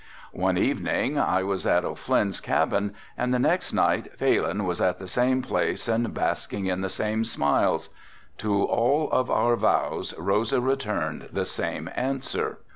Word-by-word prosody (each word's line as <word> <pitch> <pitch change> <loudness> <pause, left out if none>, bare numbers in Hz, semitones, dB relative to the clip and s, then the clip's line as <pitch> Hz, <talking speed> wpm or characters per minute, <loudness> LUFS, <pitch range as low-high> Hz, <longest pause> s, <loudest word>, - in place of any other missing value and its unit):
One - - +1
evening - - 0
I 95 0 +2
was 95 -1 -2
at 90 0 +3
O'Flynn's 100 -2 0
cabin 100 0 0 0.2
and 125 - -1
the 125 - +3
next 125 - +1
night - - +1
Phalin 100 +4 +1
was 90 -1 -2
at 90 - +2
the 95 - -9
same 125 +5 +1
place - - -1
and 115 0 +1
basking 100 - -2
in 95 0 -1
the 95 - -2
same 110 +3 -1
smiles. 90 -10 +1 0.5
To 100 -2 +1
all 145 +6 +2
of 130 - +2
our 120 0 +3
vows - - 0
Rosa 100 +8 +1
returned 130 -4 -2
the - - -1
same - - -3
answer." 135 +1 -2
105 Hz, 155 wpm, -26 LUFS, 95-125 Hz, 0.5 s, at